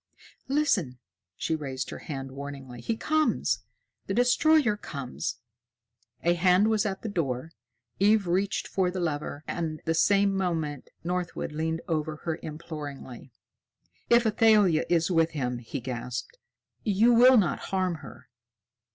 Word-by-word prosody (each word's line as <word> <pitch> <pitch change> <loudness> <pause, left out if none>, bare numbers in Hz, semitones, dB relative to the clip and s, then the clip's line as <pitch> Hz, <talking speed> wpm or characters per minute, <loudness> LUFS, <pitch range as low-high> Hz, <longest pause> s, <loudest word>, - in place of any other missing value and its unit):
"Listen!" 245 - +1 0.4
She 160 - -2
raised 135 -4 -4
her - - -7
hand 135 -3 -6
warningly. 135 -3 -8
"He 225 - -2
comes! 310 +3 +1 0.5
The 195 - -1
destroyer 250 +1 +4
comes!" 140 -10 -5 0.9
A 170 - +4
hand 180 +4 +4
was 215 -1 +2
at 190 -1 -5
the - - -3
door. 160 - -2 0.5
Eve 205 +1 +4
reached 190 +3 0
for 185 -2 +1
the 185 +1 -4
lever, 150 -3 -3
and, 155 -2 -3
the 165 - +1
same 200 +4 +3
moment, 160 -7 -2
Northwood 180 -2 -3
leaned 160 +2 -2
over 155 -1 -1
her 165 -1 -2
imploringly. 145 -5 -8 0.8
"If 235 0 +5
Athalia 210 -6 +4
is 170 +1 +2
with 165 -1 +2
him!" 125 -4 -2
he 120 +4 -5
gasped. 125 - -5 0.4
"You 220 +3 +4
will 250 +2 +7
not 195 -5 +2
harm 185 -3 0
her?" 140 - -12
170 Hz, 135 wpm, -27 LUFS, 145-205 Hz, 0.9 s, will